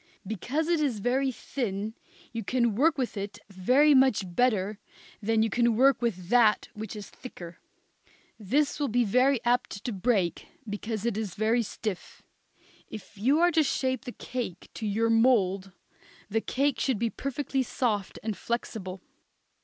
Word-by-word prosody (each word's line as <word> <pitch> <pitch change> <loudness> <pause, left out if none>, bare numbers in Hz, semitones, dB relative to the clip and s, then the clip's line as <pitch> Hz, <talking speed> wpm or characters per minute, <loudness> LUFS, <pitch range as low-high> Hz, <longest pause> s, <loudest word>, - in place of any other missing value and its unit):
Because 245 - -2
it 340 -2 +2
is 270 -7 0
very 260 +5 +1
thin 220 -5 -4 0.4
you 230 -1 -3
can 235 +1 +1
work 295 +8 +3
with 255 -4 -2
it 200 0 -5
very 255 +11 +4
much 260 -6 +4
better 205 +1 +1 0.4
than 220 +1 +2
you 225 - +1
can 235 -1 +2
with 235 -8 +2
that 230 -3 +4
which 215 0 -7
is 210 -1 -7
thicker. 175 -9 -10 0.8
This 275 +10 +1
will 290 - +1
be 245 0 +2
very 255 +5 +3
apt 240 -4 0
to 245 - -2
break, 195 -4 0 0.2
because 215 +1 -4
it 235 -3 0
is 215 -5 -4
very 220 +3 +2
stiff. 210 -3 -6 0.7
If 215 - -10
you 265 +10 +2
are 350 0 +5
to 320 - +4
shape 260 -3 -1
the 245 - -5
cake 235 -8 -6
to 220 - -4
your 225 +3 +1
mould 200 -5 +3 0.6
the 225 +1 +1
cake 275 0 0
should 260 -1 +1
be 230 +1 -1
perfectly 275 0 -2
soft 220 -6 -1
and 220 -1 -2
flexible. 195 -6 -4
230 Hz, 155 wpm, -28 LUFS, 205-260 Hz, 0.8 s, are